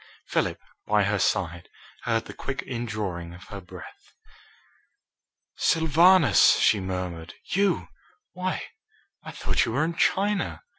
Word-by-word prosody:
Philip, - - -1 0.3
by 105 -1 +3
her 100 +1 0
side, 85 -3 -1 0.4
heard 115 -1 0
the - - -9
quick 140 +1 -5
indrawing 105 -8 -4
of 90 - -13
her 100 -1 -7
breath. 90 - -13 1.4
"Sylvanus!" 165 +2 +5
she 105 - +3
murmured. 90 -3 -5
"You! 200 +1 0 0.4
Why, 185 +1 -3 0.6
I - - -10
thought - - 0
you 115 - -2
were 145 +5 +2
in 170 - -2
China." 200 +4 0
110 Hz, 120 wpm, -26 LUFS, -, 1.4 s, Sylvanus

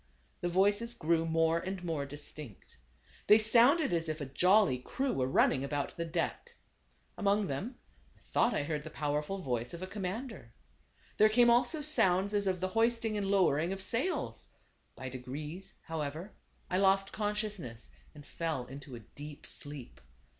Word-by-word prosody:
The 175 - -2
voices 205 +6 +2
grew 165 -4 +1
more 165 0 +2
and 185 +1 -5
more 160 -5 -2
distinct. 145 - -10 0.5
They 210 - +8
sounded 235 - +5
as 165 -1 0
if 155 0 -3
a 145 - -4
jolly 180 0 +3
crew 265 - -2
were 130 -1 0
running 130 0 +3
about 145 0 -3
the 170 - -3
deck. 175 - -3 0.6
Among 205 0 +2
them, 195 - -4 0.4
I - - -27
thought 240 - +1
I - - 0
heard 150 0 -3
the 155 - -7
powerful 150 +4 -2
voice 125 +2 -2
of 170 - -7
a - - -2
commander. 195 - -6 0.6
There 215 - +6
came 240 +2 +5
also 250 +6 +2
sounds 200 - +3
as 205 -1 +1
of 185 -1 0
the 185 - 0
hoisting 225 +1 +1
and 205 -2 -1
lowering 175 -4 +3
of 195 0 -4
sails. 235 - -1 0.5
By 130 - -7
degrees, 145 +8 -6
how 165 -2 -4
ever, 155 +8 -5 0.3
I 185 - 0
lost 195 0 +3
consciousness, 210 - -4 0.2
and 145 -1 -12
fell 160 -7 -3
into 135 0 -9
a 115 - -9
deep 145 +7 -11
sleep. 145 -4 -5
175 Hz, 165 wpm, -32 LUFS, 145-210 Hz, 0.6 s, They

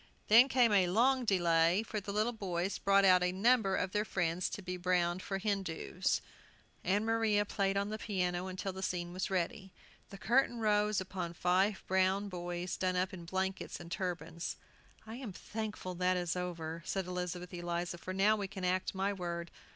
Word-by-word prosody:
Then 235 +5 +8
came 245 -4 +4
a 190 -3 +5
long 250 +7 +3
delay, 175 -1 +3
for 215 -1 -3
the 200 0 -6
little 215 +3 +1
boys 190 -3 -2
brought 200 0 +4
out 185 -1 +6
a 180 0 +2
number 200 0 +3
of 185 - -1
their 210 +1 +1
friends 180 -3 -1
to 205 - -6
be 180 0 -4
browned 180 0 +1
for 195 - -3
Hindoos. 190 -2 -1 0.6
Ann 205 +3 +1
Maria 225 -2 +2
played 195 -1 0
on 200 +1 0
the 215 +1 -4
piano 185 -3 -1
till 190 0 -3
the 190 - -7
scene 175 -2 -2
was 185 +1 -2
ready. 190 +2 -2 0.4
The 200 - -9
curtain 240 +4 +2
rose 210 -2 +2
upon 185 -2 -5
five 190 +4 +2
brown 190 +2 +1
boys 175 -1 -4
done 185 -1 0
up 185 +2 0
in 175 -2 -8
blankets 190 +2 -3
and 170 0 -10
turbans. 170 -2 -3 0.5
"I 225 +2 -7
am 245 -7 -6
thankful 210 -3 -5
that 180 +1 +1
is 175 -1 -1
over," 170 -2 -4
said 190 +2 -2
Elizabeth 180 0 -4
Eliza, 175 0 -3
"for 185 - -6
now 195 +3 +4
we 200 -2 -3
can 190 -1 -5
act 185 +1 0
my 195 +2 0
word. 170 -2 -4
190 Hz, 185 wpm, -33 LUFS, 180-205 Hz, 0.6 s, Then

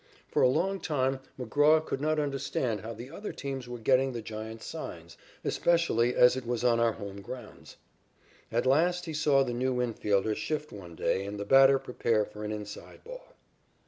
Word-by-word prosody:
For - - +2
a - - +6
long 190 +8 0
time 135 -5 0 0.2
McGraw 150 +6 +3
could 135 - -3
not 155 +1 +1
understand 135 -6 -1
how 115 - -6
the 120 +5 -9
other 205 +6 -6
teams 135 -3 -6
were 120 - -5
getting 130 +3 +2
the 120 - -4
Giants' 110 +1 -7
signs, - - -7 0.3
especially 145 -9 +2
as 125 0 +6
it 130 - -4
was 120 0 -2
on 120 -1 +3
our 115 -1 +3
home 100 -1 -8
grounds. 115 +2 -10 0.7
At 120 +2 0
last 175 +7 +2
he 160 - -5
saw 145 -3 +3
the 125 -2 -3
new 130 +1 0
infielder 110 -4 0
shift 150 -1 -3
one 90 -5 -10
day 95 - 0
and 100 +1 -6
the 100 - -3
batter 135 +2 +7
prepare 115 -4 0
for 105 +1 -10
an 105 - -3
inside 105 -1 -8
ball. - - -11
125 Hz, 185 wpm, -29 LUFS, 110-145 Hz, 0.7 s, batter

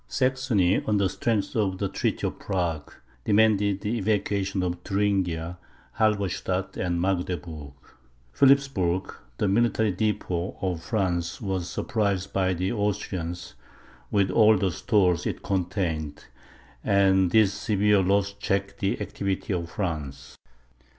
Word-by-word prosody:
Saxony, 130 -8 +1
on 105 -1 +2
the 100 -1 +2
strength 105 +1 -1
of 100 -4 0
the 100 - -1
treaty - - -2
of - - -3
Prague, 85 -6 -2 0.3
demanded 105 -1 +3
the 115 +3 -1
evacuation 100 -2 0
of 90 -1 -2
Thuringia, 90 -4 -1 0.4
Halberstadt, 100 -3 0
and 85 -1 -1
Magdeburg. 85 -5 -3 0.6
Philipsburg, 130 - +2 0.2
the - - +1
military 110 +1 +2
depot 95 -3 -2
of 90 -4 -2
France, 85 -3 -1
was 95 -4 -3
surprised 100 -3 -1
by 95 -1 +1
the 95 +2 -1
Austrians, 95 -5 -3 0.6
with 100 -2 +2
all 110 +1 +5
the 95 0 0
stores 90 -1 +1
it - - -4
contained; 85 -6 -2 0.6
and 95 -2 +3
this 105 0 +4
severe 105 -1 +2
loss 100 +1 +1
checked 100 0 -2
the 100 -1 0
activity 100 0 -3
of 85 -2 -3
France. 75 -8 -5
95 Hz, 125 wpm, -26 LUFS, 90-105 Hz, 0.6 s, all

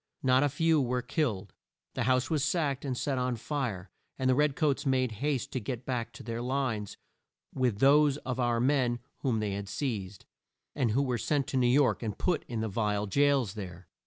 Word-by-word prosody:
Not 130 0 +4
a 145 - +3
few 160 +2 +2
were 125 -1 -1
killed. 120 - -2 0.4
The - - -1
house 130 +2 +2
was 150 -4 +1
sacked 150 -3 0
and 130 -3 -2
set 135 -1 -1
on 125 -1 0
fire, 115 -8 -3 0.3
and 130 - 0
the 130 - +5
red 145 +1 +2
coats 150 -4 +1
made 130 -3 +1
haste 145 -4 -1
to 130 - -2
get 120 +2 -5
back 120 -3 -2
to - - -10
their 115 0 -4
lines 125 -5 -2 0.6
with 125 -6 0
those 140 +3 +5
of 130 -3 -4
our 120 -1 +1
men 125 -2 +2 0.2
whom 120 -5 0
they 105 -1 -1
had 100 0 -4
seized, 105 -9 -4 0.5
and 130 -5 +1
who 130 +6 +2
were 125 -3 -1
sent 145 +1 0
to 135 - -1
New 125 -1 +3
York 135 +2 +3
and 110 -4 -4
put 180 -3 0
in 115 -2 -3
the 110 - -1
vile 105 0 0
jails 135 -1 +2
there. 90 -5 -8
130 Hz, 205 wpm, -30 LUFS, 110-140 Hz, 0.6 s, the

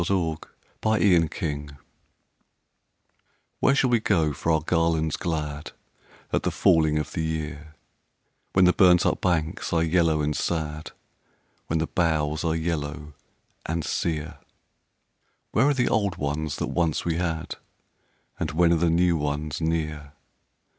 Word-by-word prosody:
A - - +2
Song 85 -4 0
of - - -13 0.4
Autumn 80 -8 +1 1.8
"Where 135 - +3
shall 130 -2 +2
we 120 - +4
go 80 -8 +1
for 80 +3 -1
our 80 -1 +2
garlands 80 -1 +1
glad 75 -4 -4 0.6
At - - +2
the - - 0
falling 80 -2 +3
of 75 0 -3
the 85 - -2
year, 80 -1 -4 0.8
When 95 -1 +5
the 90 - +5
burnt 90 -2 +5
up - - +1
banks 85 -1 -1
are 85 -2 +2
yellow 80 -2 +2
and 75 0 -1
sad, 75 -2 -3 0.8
When 80 - 0
the 80 - 0
boughs 80 -3 0
are 80 -1 0
yellow 75 -2 -3 0.5
and 80 0 -2
sere? 80 -1 -2 1.1
Where 130 +6 +3
are 145 - +2
the 125 -2 +1
old 100 -5 +1
ones 75 -1 -2
that - - -3
once 85 -3 0
we 85 -1 0
had, 80 -3 -3 0.8
And - - -1
when 85 +1 +4
are - - +3
the 85 +1 +2
new 85 +1 +3
ones 75 +1 -3
near? 75 -2 -2
80 Hz, 145 wpm, -25 LUFS, 75-85 Hz, 1.8 s, When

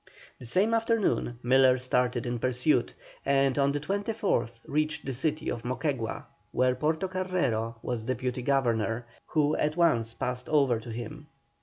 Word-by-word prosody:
The 125 - -7
same 195 - +2
afternoon 225 - +1
Miller 130 +1 +5
started 125 -1 0
in 120 -1 -2
pursuit, 125 +1 +1 0.3
and 135 -1 +3
on 140 0 +3
the 145 - -1
24th 200 - -1
reached 155 0 -1
the 135 - -2
city 155 +4 -1
of 120 - -4
Moquegua, 125 -2 -2 0.3
where 125 0 +2
Portocarrero 155 -6 -1
was 120 -3 -2
Deputy 125 0 -2
Governor, 120 -4 +1 0.2
who 150 -2 +2
at 150 +2 0
once 115 -10 +2
passed 125 0 -3
over 140 -6 +3
to 115 - -10
him. 120 +7 -7
130 Hz, 145 wpm, -28 LUFS, 120-155 Hz, 0.3 s, Miller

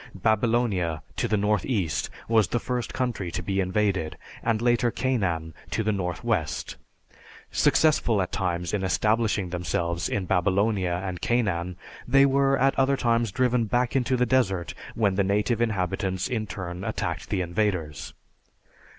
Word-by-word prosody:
Babylonia, 105 - +1
to 120 - 0
the 110 -1 +1
northeast, 105 - 0 0.2
was 110 -4 +4
the 120 - -1
first 125 -1 -3
country 120 -8 -2
to - - -4
be 100 -1 -1
invaded, 95 -3 0 0.2
and 115 -2 +1
later 120 0 +2
Canaan 95 -11 -1 0.2
to 110 - -1
the 110 - +1
northwest. 95 -2 -2 0.8
Successful 150 -9 +3
at 90 - -1
times 90 -1 -2
in 100 -2 0
establishing 105 0 +1
themselves 85 -1 -1
in 100 -3 -1
Babylonia 95 0 +1
and 90 -2 -4
Canaan, 95 -7 0 0.3
they 135 +2 +6
were 135 0 +3
at 135 +1 +3
other 135 +1 +3
times 115 -3 +1
driven 125 0 +2
back 120 +4 0
into 130 -1 +2
the 125 - +3
desert 95 - +1 0.2
when 105 -4 +2
the 100 - +3
native 105 +4 +1
inhabitants 95 -3 -1
in 115 -4 -2
turn 90 -1 -6
attacked - - -3
the 95 - 0
invaders. 85 -4 -2
105 Hz, 145 wpm, -26 LUFS, 90-120 Hz, 0.8 s, they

